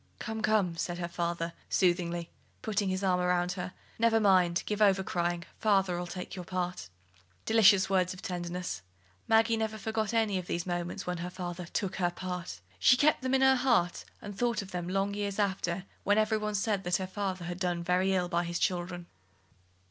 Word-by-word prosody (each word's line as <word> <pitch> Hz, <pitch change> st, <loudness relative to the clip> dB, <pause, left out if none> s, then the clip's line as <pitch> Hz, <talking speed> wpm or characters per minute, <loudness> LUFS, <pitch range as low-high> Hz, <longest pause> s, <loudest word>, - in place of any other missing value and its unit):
"Come, 220 Hz, -1 st, -4 dB
come," 210 Hz, -6 st, +2 dB
said 175 Hz, +1 st, -2 dB
her 175 Hz, -1 st, -3 dB
father, 170 Hz, -1 st, -2 dB, 0.2 s
soothingly, 175 Hz, -2 st, +1 dB, 0.3 s
putting 205 Hz, -2 st, 0 dB
his 185 Hz, +1 st, -2 dB
arm 185 Hz, -2 st, +2 dB
round 180 Hz, 0 st, +1 dB
her, 180 Hz, 0 st, -4 dB, 0.3 s
"never 225 Hz, 0 st, +4 dB
mind; 185 Hz, -4 st, +3 dB
give 210 Hz, 0 st, -2 dB
over 195 Hz, -2 st, +4 dB
crying: 175 Hz, -1 st, -1 dB, 0.2 s
father'll 190 Hz, -4 st, +2 dB
take 180 Hz, +1 st, -6 dB
your 180 Hz, -, -6 dB
part." 180 Hz, -, -3 dB, 0.6 s
Delicious 205 Hz, -4 st, +6 dB
words 185 Hz, -2 st, +2 dB
of 185 Hz, -, -9 dB
tenderness! 175 Hz, -, -4 dB, 0.5 s
Maggie 225 Hz, 0 st, +4 dB
never 220 Hz, 0 st, -2 dB
forgot 220 Hz, 0 st, -2 dB
any 220 Hz, -4 st, +1 dB
of 180 Hz, -, -8 dB
these 170 Hz, 0 st, -2 dB
moments 175 Hz, +2 st, -3 dB
when 180 Hz, 0 st, -2 dB
her 175 Hz, +1 st, -4 dB
father 180 Hz, -1 st, -6 dB
"took 195 Hz, +2 st, -2 dB
her 175 Hz, -2 st, +2 dB
part"; 175 Hz, -, -6 dB, 0.2 s
she 250 Hz, -, +6 dB
kept 300 Hz, +3 st, +3 dB
them 260 Hz, +1 st, +1 dB
in 265 Hz, -, +2 dB
her 265 Hz, 0 st, +6 dB
heart, 245 Hz, -9 st, +2 dB, 0.2 s
and 205 Hz, -1 st, -7 dB
thought 235 Hz, -1 st, 0 dB
of 195 Hz, -, -12 dB
them 175 Hz, -1 st, -3 dB
long 195 Hz, +2 st, 0 dB
years 200 Hz, -1 st, -3 dB
after, 190 Hz, -3 st, -1 dB, 0.2 s
when 205 Hz, +1 st, +3 dB
every 215 Hz, 0 st, +2 dB
one 215 Hz, 0 st, -2 dB
else 205 Hz, -, +1 dB
said 205 Hz, -2 st, 0 dB
that 180 Hz, 0 st, +1 dB
her 190 Hz, -, -3 dB
father 190 Hz, -2 st, -3 dB
had 175 Hz, +1 st, -5 dB
done 175 Hz, -2 st, -1 dB
very 180 Hz, +2 st, +2 dB
ill 180 Hz, -2 st, +1 dB
by 175 Hz, -1 st, 0 dB
his 170 Hz, 0 st, -3 dB
children. 175 Hz, 0 st, -1 dB
185 Hz, 195 wpm, -30 LUFS, 175-205 Hz, 0.6 s, Delicious